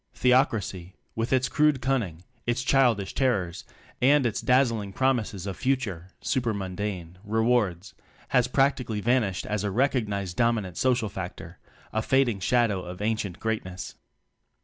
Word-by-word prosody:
Theocracy, 105 Hz, -8 st, +1 dB, 0.2 s
with 115 Hz, +1 st, -2 dB
its 130 Hz, -1 st, +3 dB
crude 150 Hz, +1 st, +3 dB
cunning, 110 Hz, -12 st, -1 dB, 0.2 s
its 120 Hz, +1 st, 0 dB
childish 120 Hz, -8 st, +2 dB
terrors 100 Hz, -11 st, 0 dB, 0.4 s
and 140 Hz, +1 st, +5 dB
its 115 Hz, -, -1 dB
dazzling 115 Hz, -6 st, +2 dB
promises 115 Hz, -8 st, 0 dB
of 100 Hz, -2 st, -4 dB
future 115 Hz, -10 st, -1 dB
(super 120 Hz, -4 st, 0 dB
mundane) 95 Hz, -2 st, -5 dB
rewards, 110 Hz, -4 st, +1 dB, 0.4 s
has 125 Hz, -1 st, +3 dB
practically 125 Hz, -4 st, +1 dB
vanished 110 Hz, -4 st, +1 dB
as 105 Hz, -1 st, -2 dB
a 105 Hz, -, 0 dB
recognized 105 Hz, -6 st, 0 dB
dominant 115 Hz, -7 st, +1 dB
social 125 Hz, -1 st, +1 dB
factor 95 Hz, -3 st, -7 dB, 0.3 s
a 110 Hz, -, +1 dB
fading 125 Hz, -3 st, +2 dB
shadow 105 Hz, -1 st, +2 dB
of 90 Hz, 0 st, -8 dB
ancient 105 Hz, -4 st, -2 dB
greatness. 100 Hz, -5 st, -4 dB
110 Hz, 130 wpm, -26 LUFS, 95-125 Hz, 0.4 s, and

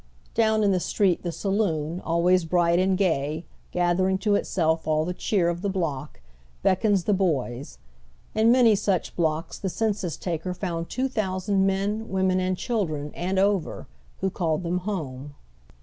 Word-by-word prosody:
Down 220 Hz, -1 st, +3 dB
in 200 Hz, -, +4 dB
the 185 Hz, -, +2 dB
street 185 Hz, -1 st, +1 dB
the 175 Hz, -, -3 dB
saloon, 170 Hz, -3 st, -1 dB
always 175 Hz, +2 st, +2 dB
bright 170 Hz, +1 st, +2 dB
and 185 Hz, 0 st, +2 dB
gay, 160 Hz, -4 st, 0 dB, 0.3 s
gathering 180 Hz, +2 st, +2 dB
to 210 Hz, -2 st, +3 dB
itself 160 Hz, -5 st, 0 dB
all 155 Hz, 0 st, +2 dB
the 180 Hz, -, -2 dB
cheer 180 Hz, -1 st, 0 dB
of 170 Hz, 0 st, -1 dB
the 200 Hz, -, -1 dB
block, 150 Hz, -, -3 dB, 0.4 s
beckons 195 Hz, 0 st, +2 dB
the 210 Hz, -, +2 dB
boys. 140 Hz, -, -1 dB, 0.6 s
In 220 Hz, +2 st, +4 dB
many 240 Hz, -3 st, +6 dB
such 195 Hz, -3 st, 0 dB
blocks 160 Hz, -1 st, -1 dB
the 195 Hz, -, -3 dB
censns 200 Hz, -4 st, -2 dB
tal; 170 Hz, -3 st, -2 dB
er 180 Hz, -1 st, -3 dB
found 170 Hz, -3 st, -4 dB
two 260 Hz, +2 st, -1 dB
thousand 195 Hz, -4 st, 0 dB
men, 205 Hz, +3 st, -1 dB
women, 190 Hz, -1 st, +1 dB
and 185 Hz, 0 st, 0 dB
chil 220 Hz, -4 st, -1 dB
dren, 150 Hz, -1 st, -5 dB
and 185 Hz, +2 st, -2 dB
over, 195 Hz, -2 st, +1 dB, 0.4 s
who 190 Hz, -, 0 dB
called 165 Hz, -2 st, -1 dB
them 175 Hz, +1 st, -1 dB
home. 145 Hz, -7 st, -5 dB
185 Hz, 165 wpm, -25 LUFS, 165-200 Hz, 0.6 s, many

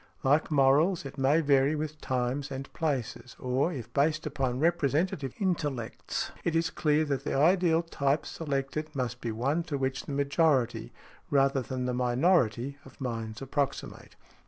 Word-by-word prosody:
Like 145 Hz, +3 st, +3 dB
morals, 150 Hz, +4 st, +3 dB
it 135 Hz, 0 st, -8 dB
may 140 Hz, +5 st, +4 dB
vary 140 Hz, 0 st, +3 dB
with 155 Hz, 0 st, -4 dB
times 130 Hz, +2 st, -1 dB
and 135 Hz, 0 st, -7 dB
places, 135 Hz, -6 st, -3 dB
or, 130 Hz, +6 st, 0 dB
if 120 Hz, -6 st, -7 dB
based 155 Hz, +3 st, +1 dB
upon 135 Hz, -4 st, -1 dB
representative 155 Hz, -3 st, +1 dB
intellects, 145 Hz, -, -2 dB
it 165 Hz, -, 0 dB
is 165 Hz, 0 st, +1 dB
clear 155 Hz, -1 st, +2 dB
that 140 Hz, -3 st, -2 dB
the -, -, -2 dB
ideal 170 Hz, +2 st, +4 dB
type 140 Hz, -3 st, 0 dB
selected 150 Hz, 0 st, -3 dB
must 125 Hz, -2 st, -3 dB
be 115 Hz, -, -2 dB
one 135 Hz, +9 st, 0 dB
to 150 Hz, -4 st, -2 dB
which 135 Hz, 0 st, -2 dB
the -, -, -4 dB
majority, 140 Hz, -, +1 dB, 0.4 s
rather 135 Hz, -1 st, +3 dB
than 130 Hz, 0 st, -4 dB
the 125 Hz, -, -1 dB
minority, 125 Hz, -, +1 dB
of -, -, -16 dB
minds 115 Hz, -2 st, -4 dB
approximate. 140 Hz, +1 st, -3 dB
140 Hz, 155 wpm, -29 LUFS, 130-155 Hz, 0.4 s, may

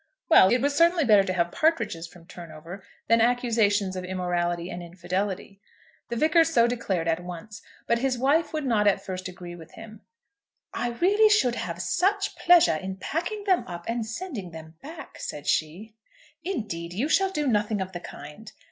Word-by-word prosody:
Well; 190 Hz, -, +7 dB
it 245 Hz, +1 st, +2 dB
was 285 Hz, 0 st, +1 dB
certainly 335 Hz, 0 st, +4 dB
better 210 Hz, -4 st, +6 dB
to 185 Hz, -, -2 dB
have 170 Hz, -1 st, 0 dB
partridges 230 Hz, -, 0 dB
from 170 Hz, 0 st, -17 dB
Turnover 170 Hz, +2 st, -10 dB, 0.2 s
than 230 Hz, 0 st, +4 dB
accusations 225 Hz, -5 st, +1 dB
of 185 Hz, -, -4 dB
immorality 175 Hz, -1 st, -2 dB
and 175 Hz, -, -6 dB
infidelity. 185 Hz, +3 st, -4 dB, 0.5 s
The 235 Hz, -, -3 dB
Vicar 315 Hz, +6 st, +4 dB
so 285 Hz, -8 st, +3 dB
declared 205 Hz, -8 st, -2 dB
at 165 Hz, +1 st, 0 dB
once, 180 Hz, +5 st, -9 dB, 0.2 s
but 235 Hz, -, +1 dB
his 255 Hz, 0 st, 0 dB
wife 285 Hz, +6 st, +2 dB
would 310 Hz, -2 st, -3 dB
not 215 Hz, -5 st, +2 dB
at 200 Hz, -, +1 dB
first 185 Hz, -1 st, -5 dB
agree 180 Hz, -1 st, -9 dB
with 165 Hz, -1 st, -14 dB
him. 220 Hz, -1 st, -12 dB, 0.7 s
"I 240 Hz, -1 st, -2 dB
really 410 Hz, -, +4 dB
should 340 Hz, -, +3 dB
have 175 Hz, -5 st, -4 dB
such 400 Hz, +1 st, 0 dB
pleasure 345 Hz, -, +5 dB
in 190 Hz, +3 st, -5 dB
packing 350 Hz, -, -4 dB
them 380 Hz, -3 st, +2 dB
up 175 Hz, -1 st, -8 dB
and 230 Hz, 0 st, -1 dB
sending 225 Hz, -, -6 dB
them 160 Hz, -1 st, -11 dB
back," 315 Hz, +4 st, -10 dB
said 145 Hz, -, -6 dB
she. 180 Hz, +8 st, -2 dB, 0.5 s
"Indeed, 210 Hz, -, -4 dB
you 230 Hz, +10 st, -1 dB
shall 385 Hz, +4 st, +2 dB
do 300 Hz, -6 st, -2 dB
nothing 210 Hz, -4 st, +1 dB
of 190 Hz, 0 st, -4 dB
the 175 Hz, -, -6 dB
kind." 150 Hz, +6 st, -11 dB
210 Hz, 180 wpm, -26 LUFS, 180-285 Hz, 0.7 s, Well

